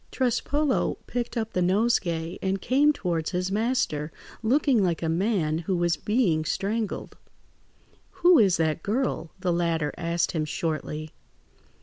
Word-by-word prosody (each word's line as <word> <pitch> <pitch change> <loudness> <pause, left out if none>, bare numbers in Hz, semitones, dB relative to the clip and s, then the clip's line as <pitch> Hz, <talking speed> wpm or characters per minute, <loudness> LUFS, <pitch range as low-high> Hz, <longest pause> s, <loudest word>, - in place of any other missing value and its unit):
Trespolo 265 +3 0
picked 245 0 -3
up 225 -1 -2
the 180 - +1
nosegay 180 -4 +1
and 190 0 -1
came 280 +8 +3
towards 170 - -2
his 180 0 -2
master, 205 - 0 0.3
looking 255 0 +3
like 175 -3 0
a - - 0
man 165 -3 0
who 175 +2 -1
was 175 -1 +2
being 200 -6 +1
strangled. 205 +5 -3 1.1
"Who 355 -2 +8
is 195 -5 +4
that 160 -1 0
girl?" 215 -5 -1
the 180 -2 +1
latter 165 -3 0
asked 170 0 0
him 160 -2 -1
shortly. 155 0 -3
185 Hz, 135 wpm, -26 LUFS, 165-230 Hz, 1.1 s, Who